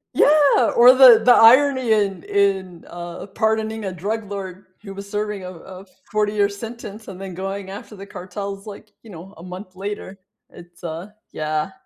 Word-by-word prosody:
Yeah! 290 Hz, -5 st, +4 dB
Or 245 Hz, +2 st, +8 dB
the 250 Hz, -4 st, +8 dB
the 245 Hz, -, +8 dB
irony 260 Hz, +1 st, +5 dB
in 200 Hz, -5 st, +1 dB
in 190 Hz, -4 st, -1 dB
uh, 175 Hz, 0 st, -8 dB
pardoning 220 Hz, +1 st, -1 dB
a 190 Hz, -, -3 dB
drug 205 Hz, +4 st, -5 dB
lord 190 Hz, -1 st, -7 dB
who 200 Hz, -2 st, -9 dB
was 200 Hz, +1 st, -9 dB
serving 210 Hz, -1 st, -4 dB
a 180 Hz, -, -7 dB
a 185 Hz, +2 st, -12 dB, 0.2 s
forty-year 210 Hz, -1 st, +1 dB
sentence 215 Hz, +1 st, -9 dB
and 190 Hz, -1 st, -10 dB
then 195 Hz, -1 st, -7 dB
going 195 Hz, +1 st, -5 dB
after 205 Hz, +2 st, -10 dB
the 195 Hz, -, -9 dB
cartels, 195 Hz, +1 st, -7 dB
like, 210 Hz, 0 st, -11 dB
you 225 Hz, -, -14 dB
know, 180 Hz, +3 st, -12 dB
a 165 Hz, -, -12 dB
month 185 Hz, +1 st, -10 dB
later. 195 Hz, 0 st, -7 dB, 0.3 s
It's, 175 Hz, +1 st, -16 dB
uh 165 Hz, +3 st, -6 dB, 0.3 s
yeah. 155 Hz, +3 st, -2 dB
200 Hz, 170 wpm, -21 LUFS, 185-220 Hz, 0.3 s, Or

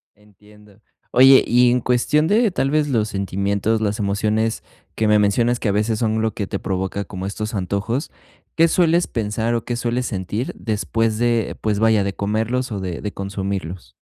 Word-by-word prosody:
Entiendo, 105 Hz, 0 st, -21 dB, 0.3 s
oye, 130 Hz, +2 st, +7 dB
y 125 Hz, 0 st, +4 dB
en 125 Hz, 0 st, +1 dB
cuestión 130 Hz, +6 st, +1 dB
de, 220 Hz, +4 st, +3 dB
tal 135 Hz, -6 st, 0 dB
vez, 150 Hz, -1 st, +2 dB
los 110 Hz, -5 st, 0 dB
sentimientos, 100 Hz, +2 st, -1 dB
las 105 Hz, 0 st, -1 dB
emociones 105 Hz, +3 st, 0 dB, 0.3 s
que 110 Hz, -, 0 dB
me 105 Hz, 0 st, +4 dB
mencionas 115 Hz, +4 st, +2 dB
que 110 Hz, -, -1 dB
a -, -, +2 dB
veces 105 Hz, +2 st, 0 dB
son 110 Hz, -1 st, 0 dB
lo 110 Hz, 0 st, -1 dB
que 100 Hz, -, -4 dB
te 100 Hz, -, -4 dB
provoca 95 Hz, +1 st, -3 dB
como 95 Hz, -1 st, -7 dB
estos 105 Hz, +3 st, -4 dB
antojos, 100 Hz, -, -2 dB, 0.4 s
¿qué 165 Hz, +1 st, +5 dB
sueles 170 Hz, 0 st, +2 dB
pensar 110 Hz, +1 st, -2 dB
o 115 Hz, -, -3 dB
qué 120 Hz, -, -2 dB
sueles 120 Hz, +1 st, -1 dB
sentir 105 Hz, +4 st, -3 dB
después 110 Hz, 0 st, -1 dB
de, 120 Hz, -1 st, 0 dB
pues 105 Hz, -1 st, 0 dB
vaya, 110 Hz, -2 st, +3 dB
de 100 Hz, -1 st, -3 dB
comerlos 110 Hz, +5 st, -1 dB
o 100 Hz, -, -3 dB
de 90 Hz, -3 st, -5 dB
de 105 Hz, -, -5 dB
consumirlos? 95 Hz, -3 st, -5 dB
110 Hz, 185 wpm, -20 LUFS, 100-120 Hz, 0.4 s, oye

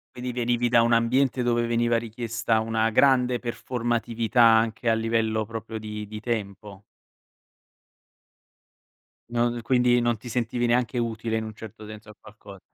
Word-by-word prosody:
Vedi, 125 Hz, 0 st, -4 dB
venivi 120 Hz, 0 st, 0 dB
da 120 Hz, 0 st, +5 dB
un 115 Hz, +1 st, +2 dB
ambiente 125 Hz, +2 st, +2 dB
dove 120 Hz, -1 st, +1 dB
veniva 120 Hz, 0 st, +1 dB
richiesta 115 Hz, 0 st, -2 dB
una 110 Hz, 0 st, 0 dB
grande 125 Hz, +1 st, +3 dB
performatività 120 Hz, -1 st, -1 dB
anche 115 Hz, +1 st, +4 dB
a 115 Hz, -, +3 dB
livello 110 Hz, -1 st, 0 dB
proprio 115 Hz, 0 st, -7 dB
di 105 Hz, -1 st, -7 dB
di 105 Hz, +1 st, -7 dB
tempo. 100 Hz, -3 st, -5 dB, 2.5 s
Non 120 Hz, 0 st, 0 dB
quindi 125 Hz, 0 st, +3 dB
non 120 Hz, -1 st, 0 dB
ti 115 Hz, -, -12 dB
sentivi 120 Hz, 0 st, -1 dB
neanche 120 Hz, 0 st, +1 dB
utile 115 Hz, -1 st, -2 dB
in 110 Hz, -, -2 dB
un 110 Hz, 0 st, -7 dB
certo 110 Hz, 0 st, -11 dB
senso 105 Hz, 0 st, -11 dB
a 105 Hz, -, -13 dB
qualco 105 Hz, -2 st, -14 dB
115 Hz, 145 wpm, -25 LUFS, 110-120 Hz, 2.5 s, da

